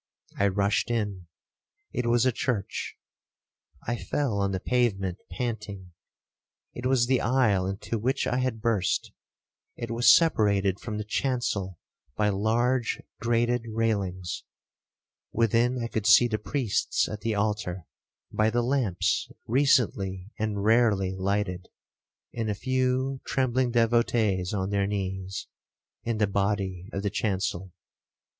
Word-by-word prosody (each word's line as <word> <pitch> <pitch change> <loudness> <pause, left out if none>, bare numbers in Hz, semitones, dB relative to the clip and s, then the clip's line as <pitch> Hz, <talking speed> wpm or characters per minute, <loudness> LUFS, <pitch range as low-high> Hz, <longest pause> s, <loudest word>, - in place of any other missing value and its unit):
I 100 - +4
rushed 100 +3 +1
in—it 110 - -5
was 120 +1 +3
a 130 - +4
church. 110 -4 -3 0.9
I 120 +1 -1
fell 105 +3 -1
on 100 -1 +1
the 95 - -2
pavement 95 -7 0
panting. 105 -6 -5 0.8
It 125 +1 -3
was 130 -2 +3
the 130 0 +2
aisle 115 -7 +2
into 100 +3 -3
which 130 +5 0
I 125 - 0
had 130 -4 -1
burst—it 115 +2 -3
was 120 +2 +6
separated 100 - +2
from 105 -2 -5
the 105 - -3
chancel 105 -6 -1 0.4
by 105 -1 +2
large 115 +4 +1 0.2
grated 120 +1 +1
railings. 100 -6 -1 0.9
Within 115 +2 +2
I 115 - -2
could 110 -3 -2
see 120 - +7
the 110 -2 -2
priests 120 0 0
at 105 -1 -6
the 110 0 -1
altar, 105 -4 -2 0.5
by 110 +1 +2
the 120 +1 +1
lamps 120 -8 0 0.2
recently 105 -7 +1
and 105 -2 -1
rarely 105 -4 +3
lighted, 95 -1 -1 0.7
and 115 -2 -2
a 105 - -1
few 130 +3 0
trembling 130 -1 +1
devotees 115 -5 +2
on 95 -1 -2
their 100 -1 +1
knees, 95 -1 -3 0.6
in 115 -1 -1
the 105 - +3
body 100 -2 -1
of 100 -2 -4
the 100 - -1
chancel. 95 -3 -2
110 Hz, 125 wpm, -27 LUFS, 100-120 Hz, 0.9 s, see